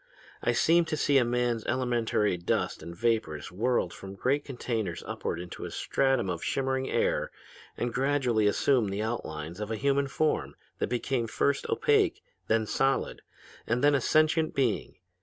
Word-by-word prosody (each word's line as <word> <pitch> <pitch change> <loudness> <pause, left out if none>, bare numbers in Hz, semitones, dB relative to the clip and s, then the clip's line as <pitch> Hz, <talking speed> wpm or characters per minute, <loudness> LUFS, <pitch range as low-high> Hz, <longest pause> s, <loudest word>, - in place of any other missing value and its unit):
I 120 - +2
seemed 165 +7 +3
to 155 -1 -2
see 140 -2 +4
man's 120 -1 0
elementary 120 -5 +1
dust 85 -1 -1
and 85 - -8
vapors 100 -9 -1
whirled 105 -2 0
from 95 0 -9
great 140 +7 0
containers 120 -5 -3
upward 85 - -3
into 90 0 -7
a - - -4
stratum 135 -5 +1
of 85 -2 -3
shimmering 130 -1 -1
air - - +1 0.5
and 120 -1 -2
gradually 130 -5 +2
assume 120 +2 +2
the 100 +2 -2
outlines 85 -7 -4
of 105 0 -4
a 110 - -1
human 140 +3 +1
form 155 +3 -1 0.2
that - - 0
became 125 0 -1
first 140 +5 0
opaque, 420 -5 +2 0.2
then 110 -1 +2
solid, 135 +5 0 0.5
and 120 +3 0
then 145 0 +5
a 140 - +2
sentient 155 +3 +2
being. 130 -6 0
120 Hz, 160 wpm, -29 LUFS, 110-140 Hz, 0.5 s, then